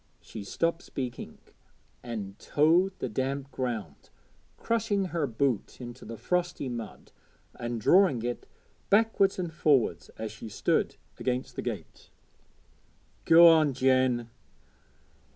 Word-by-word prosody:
She 110 - -9
stopped 165 - -1
speaking 125 -3 -6 0.6
and 105 -5 -6
toed 170 +6 +3
the - - -3
damp 135 +4 -3
ground 110 - -5 0.5
crushing 215 -4 0
her 170 -5 -1
boot 125 -1 -1
into 120 0 -9
the 115 - -7
frosty 175 - -1
mud 115 -3 -7 0.4
and 120 -1 -4
drawing 160 - +4
it 120 0 -4 0.4
backwards 205 -2 +3
and 175 -3 -4
forwards 135 - +1
as 110 -1 -5
she 110 +1 -9
stood 100 - 0 0.2
against 125 0 -2
the - - -3
gate. - - -7 1.2
'Go 170 +1 +8
on, 155 -4 +5
Jen.' 130 -3 +2
130 Hz, 115 wpm, -28 LUFS, 115-170 Hz, 1.2 s, Go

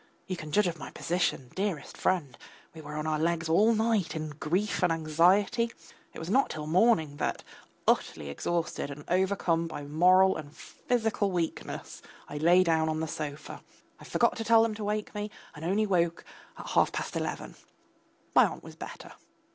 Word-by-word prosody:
You 185 - -3
can 155 -3 -8
judge 210 +6 +3
of 170 -2 -2
my - - -7
position, 170 -7 -1
dearest 190 -7 -3
friend. 155 -9 0 0.4
We 160 - -10
were 150 0 -8
on 155 0 -3
our 155 -1 0
legs 165 +1 0
all 200 +8 +4
night 220 -6 +1
in 155 -1 -3
grief 175 +8 -1
and 180 -2 +3
anxiety. 180 +9 +3 0.4
It - - -12
was 160 - -6
not 260 +9 +3
till 155 -1 -5
morning 160 -4 +3
that, - - -2 0.4
utterly 75 - +1
exhausted 165 - -2
and 145 +1 -9
overcome 180 -2 +1
by 145 - -6
moral 180 +6 +4
and 155 -1 -10
physical 225 -4 -1
weakness, 170 -3 -4 0.3
I 145 - -6
lay 175 +4 +5
down 160 -2 +2
on 155 0 -1
the 160 - -2
sofa; 150 -1 -6 0.4
I - - -13
forgot 235 - +1
to 225 - -2
tell 225 0 +6
them 225 -1 0
to 210 0 -6
wake 210 +1 -2
me, 210 0 -4 0.2
and 150 - -10
only 200 +6 +1
woke 170 -4 0 0.3
at - - -8
half - - +3
past - - -4
eleven. - - -3 0.8
My - - +7
aunt - - -8
was - - -11
better. - - -9
170 Hz, 180 wpm, -29 LUFS, 155-205 Hz, 0.8 s, My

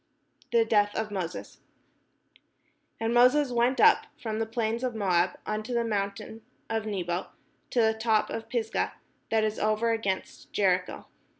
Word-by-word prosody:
THE 230 -1 +4
DEATH 205 -2 +2
OF 220 -1 -2
MOSES 180 -4 -5 1.4
And 225 +1 0
Moses 255 +3 +5
went 245 +2 +2
up - - +5
from 220 -2 -3
the 225 - -1
plains 230 +1 -2
of 250 -2 -2
Moab 185 -4 +1
unto 215 +3 -3
the 235 - +2
mountain 205 +1 -3 0.3
of 220 -1 -1
Nebo, 180 -3 -2 0.4
to 240 - +2
the 220 0 +3
top 220 -1 +1
of 225 0 -5
Pisgah, 225 -3 -1 0.4
that 220 -1 +2
is 215 0 -1
over 215 +2 +1
against 200 -4 -3
Jericho. 185 -2 0
220 Hz, 145 wpm, -28 LUFS, 205-230 Hz, 1.4 s, Moses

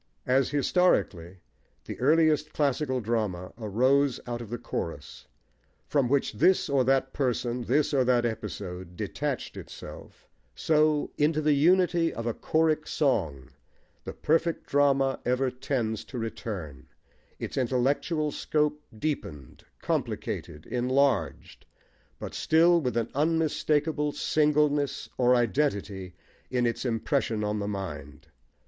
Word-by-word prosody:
As, 130 +1 +2
historically, 105 - +1 0.4
the - - -7
earliest 155 +2 +3
classic 145 -1 0
drama 105 -6 -2
arose 130 +5 +2
out 120 -1 -4
of 115 - -8
the 120 - -3
chorus, 80 -9 -6 0.6
from 135 -4 +1
which 140 -2 +1
this 185 - +3
or 140 -2 +2
that 135 0 +1
person, 125 -2 -1
this 145 +5 +1
or 135 -2 +3
that 120 -1 +3
episode, 95 -5 -5
detached - - -3
itself, - - -11 0.3
so, 155 -1 +2
into 150 +1 +2
the 150 -1 +3
unity 170 +2 +3
of 115 - -6
a 120 - 0
choric 155 +2 +1
song 75 - -1 0.5
the - - -6
perfect 165 +1 0
drama 135 -1 +2
ever 125 +1 +1
tends 120 -4 -2
to 125 - -8
return, 100 - -6 0.5
its - - -6
intellectual 135 +5 0
scope 150 0 0 0.2
deepened, 75 - -5 0.2
complicated, 75 - -3
enlarged, 130 -1 0 0.5
but - - -7
still 170 +2 +4
with 125 -4 -2
an 115 - -1
unmistakable 150 0 +1
singleness, 150 -1 +1
or 125 0 +5
identity, 100 -7 -1 0.3
in 125 -1 +1
its 120 +2 -2
impression 115 -2 0
on 105 0 -1
the 100 - -3
mind. 75 -8 -6
130 Hz, 120 wpm, -27 LUFS, 110-150 Hz, 0.6 s, or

